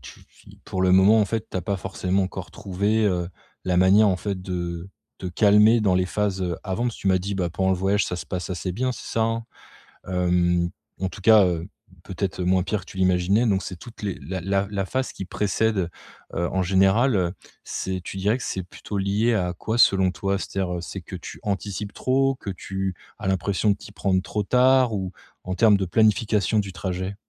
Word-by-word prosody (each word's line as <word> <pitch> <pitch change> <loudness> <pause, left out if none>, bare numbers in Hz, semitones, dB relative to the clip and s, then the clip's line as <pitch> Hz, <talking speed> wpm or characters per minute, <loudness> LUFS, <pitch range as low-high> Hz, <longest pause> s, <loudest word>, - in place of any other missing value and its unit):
tu - - -12
fi - - -19
pour 95 - -3
le 90 0 +4
moment, 100 +4 +6
en - - +4
fait, 110 +2 -3
tu - - -4
as 90 - -2
pas 100 +2 -1
forcément 95 0 -1
encore 95 - -5
trouvé, 100 +3 0
heu, 90 -3 0 0.4
la 90 -1 +1
manière, 95 +4 +6
en 95 - +2
fait, 100 -1 -4
de 85 -1 -4 0.3
te 95 - -6
calmer 105 +5 +5
dans 95 -3 +3
les 90 0 +1
phases, 100 -1 -1
heu, 85 -2 -1
avant, 100 +4 -2
parce 120 - -1
que - - -12
tu 95 - 0
m'as 95 -1 +4
dit: 100 +2 -4
«Ben 90 -3 -1
pendant 95 +2 0
le 95 - +2
voyage, 100 +2 +1
ça - - -3
se 90 - -6
passe 90 +1 -4
assez 90 0 -3
bien». 125 +7 -1
C'est - - -9
ça 115 - +1
hein? 115 0 -1 0.6
Hem, 90 -1 +1 0.3
en 95 - 0
tout 95 +2 -9
cas, 110 -1 +7
heu, 85 0 -1 0.4
peut-être 95 0 -3
moins 90 +1 +3
pire 100 0 -2
que - - -13
tu 95 - -11
l'imaginais. 95 +5 +3
Donc, 95 -2 +1
c'est 90 - -6
toutes 115 +6 -12
les 100 -3 -2
la 95 -1 -6
la 100 +2 0
la 100 -2 -2
phase 130 +5 -2
qui - - -6
précède, 105 -1 0 0.5
heu, 85 +1 0
en 95 - 0
général, 95 +7 +3
heu, 90 -1 +1 0.3
c'est 95 -1 -4
tu 95 - -6
dirais 105 +6 +1
que - - -7
c'est 95 - -3
plutôt 100 +3 -7
lié 100 +4 +1
à 90 -3 0
quoi, 110 +2 -2
selon 95 -5 +5
toi? 100 +1 -1
C'est-à-dire, 95 -2 -3
heu, 85 - -3
que - - -6
c'est 95 - -6
que 95 - -9
tu 85 - -9
anticipes 100 0 -3
trop? 135 +1 +1
Que 110 - -8
tu 95 +1 -3 0.2
as 100 -2 -5
l'impression 95 +3 +1
de - - +1
t'y - - -12
prendre 95 -3 +1
trop 105 +1 -3
tard? 125 +1 +4
Ou 95 -2 -3 0.3
en 95 0 -3
termes 105 -2 +5
de 95 - -1
planification 105 +1 +2
du 95 -2 -3
trajet? 95 +1 -4
95 Hz, 225 wpm, -24 LUFS, 90-105 Hz, 0.6 s, cas